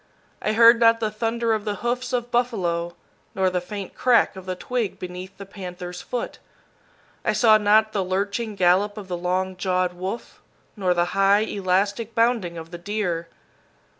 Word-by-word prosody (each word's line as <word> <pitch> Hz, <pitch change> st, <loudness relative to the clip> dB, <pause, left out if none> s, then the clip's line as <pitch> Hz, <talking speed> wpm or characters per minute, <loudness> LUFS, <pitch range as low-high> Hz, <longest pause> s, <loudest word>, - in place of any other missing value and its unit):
I 215 Hz, -, 0 dB
heard 230 Hz, +1 st, +7 dB
not 230 Hz, -1 st, +5 dB
the 220 Hz, -2 st, -1 dB
thunder 230 Hz, +1 st, 0 dB
of 215 Hz, -1 st, -1 dB
the 210 Hz, -1 st, -2 dB
hoofs 245 Hz, +1 st, -1 dB
of 245 Hz, -1 st, -2 dB
buffalo, 175 Hz, -9 st, 0 dB, 0.4 s
nor 190 Hz, -1 st, +2 dB
the 180 Hz, -1 st, -1 dB
faint 200 Hz, +1 st, -7 dB
crack 240 Hz, -6 st, +3 dB
of 190 Hz, -1 st, -10 dB
the 185 Hz, -, -2 dB
twig 230 Hz, +2 st, -3 dB
beneath 180 Hz, +1 st, -8 dB
the 200 Hz, -, -8 dB
panther's 180 Hz, -2 st, -8 dB
foot. 245 Hz, -, -5 dB, 0.8 s
I -, -, +1 dB
saw 220 Hz, -3 st, +5 dB
not 215 Hz, +1 st, +4 dB
the 200 Hz, -3 st, 0 dB
lurching 200 Hz, +4 st, -2 dB
gallop 195 Hz, +3 st, +2 dB
of 205 Hz, -3 st, -7 dB
the 180 Hz, -, -2 dB
long 185 Hz, +2 st, -1 dB
jawed 180 Hz, -1 st, 0 dB
wolf, 185 Hz, +6 st, -6 dB, 0.3 s
nor 185 Hz, -4 st, +1 dB
the 175 Hz, 0 st, +2 dB
high, 195 Hz, +1 st, +4 dB
elastic 205 Hz, +2 st, -1 dB
bounding 230 Hz, -7 st, +1 dB
of 165 Hz, 0 st, -9 dB
the 175 Hz, -, -7 dB
deer. 175 Hz, -3 st, -2 dB
200 Hz, 170 wpm, -23 LUFS, 180-225 Hz, 0.8 s, heard